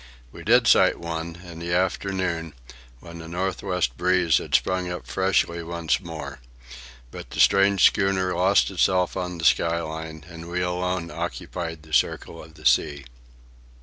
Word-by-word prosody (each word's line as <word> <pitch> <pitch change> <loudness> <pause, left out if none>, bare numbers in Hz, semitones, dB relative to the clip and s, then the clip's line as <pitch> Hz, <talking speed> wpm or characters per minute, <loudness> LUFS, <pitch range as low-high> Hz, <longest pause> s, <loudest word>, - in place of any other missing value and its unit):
We - - -11
did - - +4
sight - - +5
one, 85 0 -5
in 85 -2 -10
the 85 +1 -3
afternoon, 90 -4 -1 0.5
when 85 0 -11
the 80 - -9
north 95 +3 -3
west 90 -10 -1
breeze 90 -2 +3
had - - -2
sprung 90 -1 +1
up 90 -8 -6
freshly 85 +4 0
once 85 -1 -1
more. 85 -4 -8 0.7
But - - -9
the - - -7
strange 100 -1 +5
schooner 95 -2 +2
lost 95 +3 +3
itself 90 -1 +1
on 90 -2 -4
the 80 - -4
sky 85 0 +3
line 80 -1 -7
and 85 -1 -10
we 90 +1 -2
alone 90 -1 -2
occupied 80 -3 -5
the 80 0 -14
circle 80 +5 0
of 80 0 -16
the - - -15
sea. 70 -2 +2
85 Hz, 160 wpm, -24 LUFS, 80-90 Hz, 0.7 s, sight